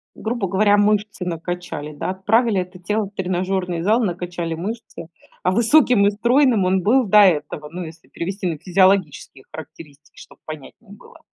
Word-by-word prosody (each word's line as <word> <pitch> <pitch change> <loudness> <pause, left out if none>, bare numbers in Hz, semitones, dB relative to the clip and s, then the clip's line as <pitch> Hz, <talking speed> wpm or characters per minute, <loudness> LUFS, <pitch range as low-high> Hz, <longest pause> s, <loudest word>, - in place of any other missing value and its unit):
Грубо 220 -2 -3
говоря, 205 +3 +3
мышцы 205 -2 0
накачали, 165 -3 -5
да, 145 - -4
отправили 205 +2 +1
это 180 0 -10
тело 210 +4 -1
в 195 - -12
тренажерный 185 -2 -2
зал, 215 +6 +2
накачали 175 -2 -3
мышцы, 185 -2 -7 0.4
а 185 - +2
высоким 235 -1 +4
и - - +2
стройным 235 -1 +2
он 185 0 +1
был 250 +6 +3
до 210 +1 +5
этого. 150 -4 +1
Ну, 180 +3 -6
если 160 0 -12
перевести 190 +2 -5
на 165 -3 -3
физиологические 180 -6 +1
характеристики, 155 -1 -13
чтобы - - -16
понятнее 155 - -11
было. - - -17
185 Hz, 160 wpm, -20 LUFS, 170-210 Hz, 0.4 s, до